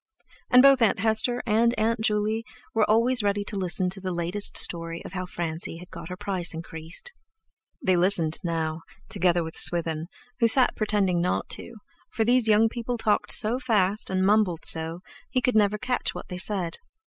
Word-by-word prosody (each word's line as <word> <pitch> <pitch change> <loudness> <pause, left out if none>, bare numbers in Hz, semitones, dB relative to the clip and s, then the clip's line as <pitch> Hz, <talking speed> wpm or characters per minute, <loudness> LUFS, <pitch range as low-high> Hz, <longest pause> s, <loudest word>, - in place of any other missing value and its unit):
And 250 0 +6
both 275 -2 +5
Aunt 225 - +3
Hester 225 +3 +1
and 235 +2 +2
Aunt 225 +1 0
Juley 215 +1 -1 0.3
were 220 -2 +1
always 235 +3 +2
ready 205 0 -1
to 205 - -4
listen 185 -1 +1
to 195 +1 -3
the 185 - -4
latest 175 +3 -1
story 165 -1 +1
of - - -9
how 185 -1 -5
Francie 165 -1 -5
had 180 +2 -14
got - - -9
her 180 - -7
price 185 -4 -3
increased. 165 - -6 0.7
They 185 - +3
listened 175 -3 +2
now, 160 -2 -3 0.3
together 180 -5 +1
with 160 0 -8
Swithin, 165 -2 +2 0.3
who 230 - +4
sat 250 +3 +7
pretending 200 -5 0
not 180 - -2
to, 235 - -4 0.3
for 220 0 -2
these 245 0 +2
young 215 +1 +4
people 240 +1 -5
talked 210 -2 0
so 230 +4 +3
fast 215 -5 0
and 190 0 0
mumbled 200 -5 +1
so, 165 +2 -2 0.3
he 255 - 0
never 210 -1 +2
could - - -11
catch 250 -1 -2
what - - -9
they 180 - -6
said. 185 -3 +1
200 Hz, 185 wpm, -25 LUFS, 175-225 Hz, 0.7 s, sat